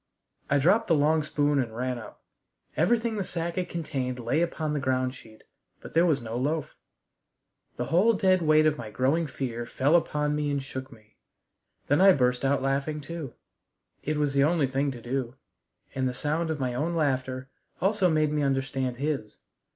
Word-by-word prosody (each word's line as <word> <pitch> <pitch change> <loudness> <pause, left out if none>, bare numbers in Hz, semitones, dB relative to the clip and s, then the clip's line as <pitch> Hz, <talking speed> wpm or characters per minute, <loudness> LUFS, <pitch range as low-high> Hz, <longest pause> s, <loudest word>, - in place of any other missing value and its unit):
I 140 - +3
dropped 200 +11 +3
the 165 - +4
long 155 +2 +3
spoon 145 -1 +1
and 115 -3 -3
ran 125 0 -2
up. 110 - -12 0.5
Everything 225 +6 +1
the 200 - 0
sack 170 -1 -3
had 180 -1 -2
contained 135 -6 -3
lay 125 +7 0
upon 160 -3 -1
the 150 - 0
ground 130 -1 0
sheet, 110 -4 -15 0.4
but - - -11
there 170 +2 +4
was 145 -6 +1
no 115 +1 -4
loaf. 150 +4 -2 1.0
The 120 - -3
whole 190 - +4
dead 190 -3 +3
weight 155 -1 +4
of 150 -1 +2
my 110 -3 -6
growing 135 +9 +1
fear 120 -4 -4
fell 140 +6 +2
upon 150 -3 +1
me 150 -1 -1
and 140 -1 0
shook 130 0 -7
me. 110 -3 -19 0.7
Then 145 - +2
I 195 0 +8
burst 125 -3 +1
out 135 0 +1
laughing 140 +3 -1
too. 155 -2 -7 0.7
It 155 +1 -2
was 145 -2 0
the 140 0 +4
only 155 -1 +3
thing 135 +2 0
to 125 -3 -7
do: 125 0 -3 0.6
and 130 -1 0
the 125 - -6
sound 160 +4 -1
of 155 -2 -2
my 130 -2 -1
own 160 +7 -1
laughter 130 -3 -1 0.3
also 195 -1 +2
made 155 -2 +2
me 150 0 0
understand 135 -2 -1
his. 140 -6 -3
145 Hz, 190 wpm, -27 LUFS, 130-160 Hz, 1.0 s, I